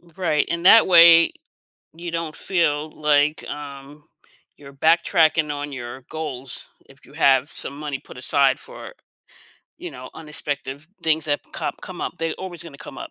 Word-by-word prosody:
Right, 165 -5 0
and 170 +1 -3
that 225 +4 +8
way, 170 -2 +8 0.6
you 170 +1 -7
don't 165 -2 -4
feel, 155 -4 0
like, 150 0 +2
um, 145 0 -9 0.5
you're 140 -1 -14
backtracking 160 0 +3
on 145 0 -5
your 120 0 -7
goals 135 -5 -6 0.2
if 135 0 -20
you - - -18
have 140 -2 +3
some 140 - -7
money 145 -2 -5
put - - -14
aside 135 +1 +2
for, - - -11 0.9
you - - -7
know, 130 +1 -10
unexpected 145 -2 -5 0.2
things 160 0 +2
that 145 -1 0
com - - -3
come - - -8
up, - - -3
they're 165 0 -1
always 180 -4 -8
gonna 150 -5 -12
come - - -10
up. 330 -1 -8
150 Hz, 160 wpm, -22 LUFS, 140-165 Hz, 0.9 s, that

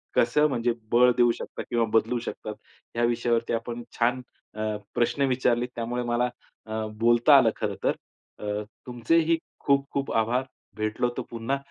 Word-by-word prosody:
कसं 150 +6 +4
म्हणजे 120 -2 +1 0.2
बळ 125 +1 +6
देऊ 120 -1 +5
शकता - - -6
किंवा 115 -1 +2
बदलू 115 +2 +3
शकतात 110 -2 -6 0.4
या 120 - +1
विषयावरती 120 0 +1
आपण 115 +1 -3 0.2
छान 125 +2 +2 0.3
अ, 110 0 -2 0.2
प्रश्न 130 +4 +1
विचारले, 125 -2 +2
त्यामुळे 120 +1 -2
मला 120 +1 +1 0.4
अ, 110 0 -3
बोलता 120 0 +6
आलं - - +5
खरं - - -2
तर. - - +3 0.5
अ, 105 0 -3 0.2
तुमचेही 160 +8 +2 0.2
खूप 140 -1 +2
खूप 140 -1 -2
आभार 115 +3 +2 0.3
भेटलो 110 +3 0
तर - - 0
पुन्हा 115 +4 -2
120 Hz, 155 wpm, -26 LUFS, 115-125 Hz, 0.5 s, बळ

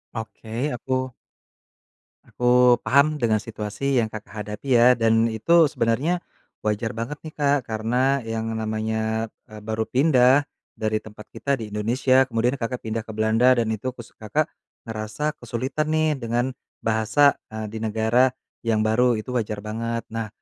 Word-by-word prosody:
Oke, 110 +4 -4
aku 130 +1 -2 1.1
aku 125 0 +4
paham 150 +3 +3
dengan 110 -2 +3
situasi 110 +5 -2
yang 110 - -2
Kakak 110 0 -8
hadapi 105 +6 -7
ya, 120 +1 +6
dan 115 0 +3
itu 160 +8 +4
sebenarnya 140 +10 0 0.4
wajar 105 +1 0
banget 125 +6 -4
nih, 155 -1 -9
Kak, 145 -1 +3
karena 125 +5 +1
yang 115 0 -3
namanya, 110 0 -2 0.2
eee, 110 0 -10
baru 110 +1 -2
pindah 130 +1 +4 0.4
dari 110 0 0
tempat 105 -1 -12
kita 140 - -3
di 110 - -6
Indonesia, 130 +5 +3
kemudian 120 +4 +1
Kakak 125 +1 -3
pindah 110 0 -2
ke 110 - -8
Belanda 110 +4 +4
dan 115 -2 +1
itu 110 +4 -3
kus 120 -3 -12
Kakak 145 +9 -1 0.4
ngerasa 115 +8 -3
kesulitan 130 +6 -2
nih 155 -2 +2
dengan 120 +2 -1 0.3
bahasa, 110 +6 +3 0.2
eee, 110 0 -4
di 110 - -6
negara 110 +4 +2 0.3
yang 110 -1 +2
baru, 120 +3 +3
itu 110 +4 -7
wajar 105 -2 -2
banget. 115 +2 -3
Nah, 115 -1 -3
115 Hz, 150 wpm, -24 LUFS, 110-130 Hz, 1.1 s, ya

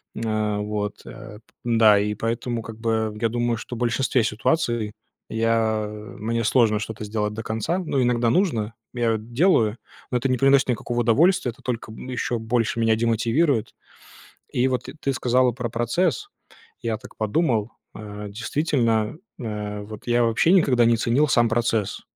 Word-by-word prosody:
М, 110 -2 -1
вот, 105 -1 -4
э. 105 - -10 0.2
Да, 110 -3 +5
и 105 +1 0
поэтому 115 +1 -2
как 110 +1 -9
бы 110 -1 -1
я 115 - +2
думаю, 120 0 0
что 120 - -7
в - - -7
большинстве 125 0 +1
ситуаций 115 -1 0 0.4
я 110 -1 +1
мне 110 +2 -4
сложно 110 -2 +3
что-то 110 0 -6
сделать 105 0 -2
до 110 +1 -5
конца. 110 - -1
Ну, 155 -7 -1
иногда 120 -1 +2
нужно, 115 - +1 0.2
я 115 -2 +1
делаю, 120 - +2 0.3
но 125 - +2
это 135 - 0
не 130 - +2
приносит 135 -1 +4
никакого 120 0 -1
удовольствия, 130 +4 +3
это 115 - -20
только 115 -3 -4
еще 125 0 -3
больше 115 0 0
меня 115 -1 +3
демотивирует. 115 +3 +1 0.8
И 125 +2 +2
вот 130 -1 -1
т - - -8
ты 135 - 0
сказала 125 0 +2
про 120 0 -4
процесс. 120 - 0 0.5
Я 115 -2 -1
так 125 +3 -14
подумал, 110 -1 0 0.2
э, 105 0 -7
действительно, 115 0 0 0.2
э, 105 -3 -4
вот 105 +1 -10
я 120 0 +3
вообще 115 +8 +3
никогда 130 -10 +4
не 115 0 +4
ценил 120 +7 +2
сам 120 -3 +4
процесс. 115 -3 0
115 Hz, 160 wpm, -23 LUFS, 110-125 Hz, 0.8 s, Да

